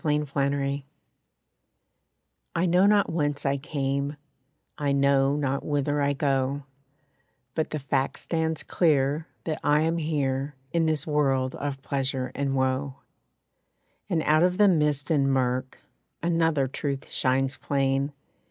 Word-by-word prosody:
=I 150 -2 +2
Am= 140 -1 -1 1.7
I 170 +2 +2
know 180 +3 +4
not 205 -3 +3
whence 145 -3 -1
I 140 0 +2
came, 140 0 -2 0.6
I 145 -2 -1
know 140 0 +3
not 140 -2 -1
whither 145 0 0
I 140 0 +2
go; 135 0 0 0.9
But 160 - -1
the 155 - -3
fact 135 -1 -1
stands 160 -1 -2
clear 150 -1 +1 0.2
that 155 -2 -3
I 150 +1 +4
am 165 +1 +1
here 145 -3 -1 0.2
In 165 -1 +2
this 155 -2 0
world 135 -4 +1
of 140 -1 -4
pleasure 135 -2 -2
and 140 -1 -1
woe. 130 +1 0 1.1
And 165 -4 +1
out 155 +1 +4
of 180 +1 +3
the 210 0 +6
mist 150 -4 +2
and 140 -3 +3
murk, 130 0 0 0.5
Another 165 -5 +2
truth 135 +1 -4
shines 135 +1 +1
plain. 135 0 0
140 Hz, 135 wpm, -26 LUFS, 135-155 Hz, 1.7 s, the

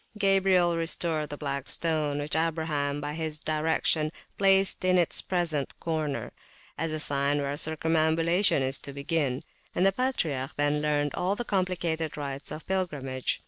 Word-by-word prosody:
Gabriel 190 -3 +4
restored 165 -2 -1
the 145 - -6
Black 140 -1 -3
Stone, 155 -3 +1
which 145 +1 -2
Abraham, 160 -3 0
by 145 0 -4
his 155 -1 -3
direction, 155 0 +1 0.2
placed 195 -1 +3
in 185 0 +4
its 175 -2 +3
present 165 -6 -1
corner, 155 -3 -2 0.4
as 165 -1 -2
a 155 - -1
sign 140 0 +2
where 140 0 -1
circumambulation 160 +2 +2
is 135 +1 0
to 140 - -8
begin; 140 -1 -1 0.3
and 180 - +3
the 195 - +5
patriarch 165 - -1
then 145 0 +1
learned 145 -1 +1
all 190 +3 0
the 240 - -4
complicated 175 -6 -1
rites 140 -1 -4
of 155 - -7
pilgrimage. 145 -9 -2
155 Hz, 150 wpm, -28 LUFS, 145-175 Hz, 0.4 s, the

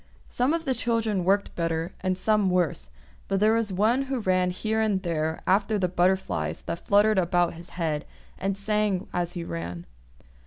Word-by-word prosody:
Some 255 +6 +1
of 330 -1 -4
the 265 - +1
children 225 -5 0
worked 200 +3 +1
better, 165 +1 -2
and 185 -1 0
some 210 -1 +2
worse; 175 - 0 0.4
but 195 -1 0
there 215 +2 +4
was 225 -3 0
one 225 +8 +2
who 265 -1 -2
ran 185 -3 +2
here 220 +4 -1
and 210 -3 +1
there 160 -2 -2
after 200 +3 +2
the 185 -2 +1
butterflies 185 +2 0
that 170 0 -6
fluttered 205 0 +4
about 175 -1 +2
his 170 +1 -11
head, 155 -4 -1 0.3
and 195 0 -1
sang 205 -2 0
as 175 0 -1
he 175 - -4
ran. 85 - -5
190 Hz, 180 wpm, -26 LUFS, 175-215 Hz, 0.4 s, there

